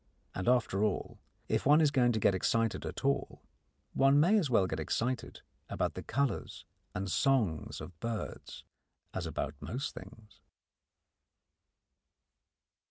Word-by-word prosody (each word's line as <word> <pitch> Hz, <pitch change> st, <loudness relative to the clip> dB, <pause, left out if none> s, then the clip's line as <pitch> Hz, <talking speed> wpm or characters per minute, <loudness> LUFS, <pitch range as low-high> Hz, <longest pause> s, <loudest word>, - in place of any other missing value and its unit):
And 90 Hz, -, -4 dB
after 115 Hz, -5 st, +2 dB
all, 105 Hz, -3 st, -2 dB, 0.3 s
if -, -, 0 dB
one 145 Hz, +3 st, +6 dB
is 155 Hz, -3 st, +4 dB
going 125 Hz, -4 st, +3 dB
to 110 Hz, -, 0 dB
get 100 Hz, -1 st, +3 dB
excited 115 Hz, +4 st, 0 dB
at -, -, -6 dB
all, 140 Hz, 0 st, -1 dB, 0.5 s
one 135 Hz, +1 st, +5 dB
may 175 Hz, +8 st, +5 dB
as 160 Hz, -8 st, -1 dB
well 110 Hz, -6 st, +4 dB
get 80 Hz, -3 st, -3 dB
excited 115 Hz, -, -2 dB, 0.3 s
about -, -, -1 dB
the -, -, -6 dB
colours 140 Hz, -3 st, -2 dB, 0.3 s
and 100 Hz, -, -2 dB
songs 110 Hz, -, +1 dB
of 85 Hz, -3 st, -10 dB
birds 115 Hz, +1 st, -5 dB, 0.5 s
as -, -, -3 dB
about 75 Hz, -, -3 dB
most 125 Hz, -, -4 dB
things. 110 Hz, -2 st, -13 dB
115 Hz, 135 wpm, -32 LUFS, 100-135 Hz, 0.5 s, one